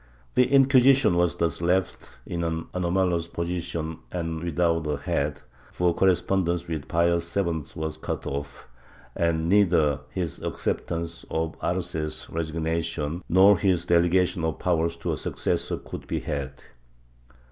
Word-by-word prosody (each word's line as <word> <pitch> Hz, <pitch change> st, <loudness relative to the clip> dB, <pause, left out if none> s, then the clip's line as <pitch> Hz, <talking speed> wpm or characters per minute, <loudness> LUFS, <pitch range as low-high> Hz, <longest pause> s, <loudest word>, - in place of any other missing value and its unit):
The 125 Hz, -, +4 dB
Inquisition 135 Hz, -4 st, +5 dB
was 85 Hz, -1 st, +2 dB
thus 85 Hz, -1 st, -1 dB
left 90 Hz, +2 st, 0 dB, 0.2 s
in 85 Hz, -1 st, -3 dB
an 80 Hz, -1 st, -2 dB
anomalous 90 Hz, -1 st, +1 dB
position 85 Hz, -2 st, -3 dB
and 80 Hz, -2 st, -3 dB
without 85 Hz, -1 st, +1 dB
a 75 Hz, -1 st, -1 dB
head, 70 Hz, +1 st, -2 dB, 0.3 s
for 90 Hz, -1 st, +2 dB
correspondence 90 Hz, -2 st, +1 dB
with 80 Hz, -5 st, -4 dB
Pius 85 Hz, +1 st, +1 dB
VII 85 Hz, -5 st, 0 dB
was 80 Hz, 0 st, -4 dB
cut -, -, -4 dB
off, 70 Hz, -1 st, -5 dB, 0.5 s
and 80 Hz, -1 st, +1 dB
neither 85 Hz, -7 st, +3 dB
his 85 Hz, -5 st, -4 dB
accept -, -, -2 dB
ance 85 Hz, 0 st, -4 dB
of 80 Hz, 0 st, -1 dB
Arce's 85 Hz, -4 st, -2 dB
resignation 80 Hz, 0 st, -2 dB
nor 95 Hz, +1 st, +6 dB
his 95 Hz, -4 st, +2 dB
delegation 85 Hz, +1 st, +2 dB
of 80 Hz, -1 st, -1 dB
powers 85 Hz, -1 st, 0 dB
to 85 Hz, 0 st, -3 dB
a 75 Hz, -, -2 dB
succes -, -, -1 dB
sor -, -, -3 dB
could -, -, -9 dB
be -, -, -1 dB
had. 70 Hz, -1 st, -5 dB
85 Hz, 140 wpm, -26 LUFS, 80-90 Hz, 0.5 s, nor